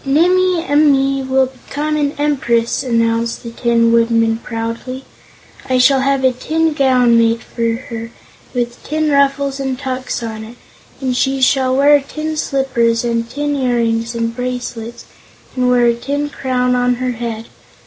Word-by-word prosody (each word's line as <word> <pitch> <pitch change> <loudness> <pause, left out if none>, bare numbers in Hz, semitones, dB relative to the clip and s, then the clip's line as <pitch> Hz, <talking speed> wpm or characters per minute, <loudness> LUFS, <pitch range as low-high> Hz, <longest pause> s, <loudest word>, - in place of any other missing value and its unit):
"Nimmie 355 +4 +2
Amee 275 -2 +3
will 265 0 +2
become 290 +4 -4
an 290 -1 0
Empress!" 245 -6 0
announced 230 -1 0
the 235 - -7
Tin 230 -1 +2
Woodman, 230 -1 +2
proudly. 230 +3 -5 0.6
"I 255 - +2
shall 265 +2 +5
have 275 0 +1
a 260 - +4
tin 315 +5 -1
gown 250 -4 +3
made 230 0 +1
for 230 -1 -2
her, 230 -1 -7 0.4
with 240 -1 -3
tin 310 0 -1
ruffles 280 0 +1
and 265 -1 -2
tucks 255 -2 -4
on 220 -1 -5
it, 230 +2 -12 0.4
and 260 -2 -1
she 270 +2 0
shall 260 0 +2
have 285 -1 +4
tin 310 0 -4
slippers, 255 -6 0
and 230 -1 -1
tin 290 +3 -2
earrings 235 -3 0
and 230 0 -2
bracelets, 245 -2 -5 0.5
and 250 -1 +1
wear 245 -1 +4
a 235 - +4
tin 285 +5 -3
crown 250 -2 0
on 245 0 +2
her 255 +1 -2
head. 230 -1 -5
255 Hz, 155 wpm, -16 LUFS, 235-275 Hz, 0.6 s, shall